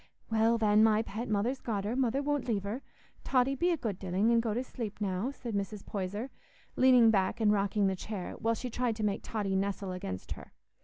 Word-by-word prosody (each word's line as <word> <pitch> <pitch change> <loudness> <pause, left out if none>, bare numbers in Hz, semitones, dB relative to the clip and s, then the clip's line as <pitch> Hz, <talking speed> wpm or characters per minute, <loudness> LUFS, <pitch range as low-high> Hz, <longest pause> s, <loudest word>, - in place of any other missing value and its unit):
"Well, 225 +1 +3
then, 215 -1 +4
my 220 0 +4
pet, 225 +2 -5
Mother's 220 +6 0
got 210 -4 -2
her, 215 +4 -2
Mother 265 +1 +1
won't 290 -2 -1
leave 210 -5 0
her; 215 +6 -4 0.4
Totty 260 +1 +2
be 345 +7 +1
a 340 - +2
good 215 -9 -3
dilling, 190 +4 +1
and 230 -1 +4
go 225 -2 -1
to 245 - 0
sleep 225 -5 -6
now," 200 +3 -1
said 245 -4 -6
Mrs. 200 0 -3
Poyser, 205 +6 -4 0.4
leaning 250 -3 +6
back 195 +2 +1
and 215 -2 +4
rocking 200 0 +1
the 190 -1 +1
chair, 190 -1 -5
while 230 0 +1
she 250 +2 -5
tried 245 -1 0
to 215 - -4
make 200 -1 0
Totty 205 -3 -2
nestle 195 0 -1
against 95 - -6
her. - - -7
220 Hz, 215 wpm, -31 LUFS, 200-240 Hz, 0.4 s, leaning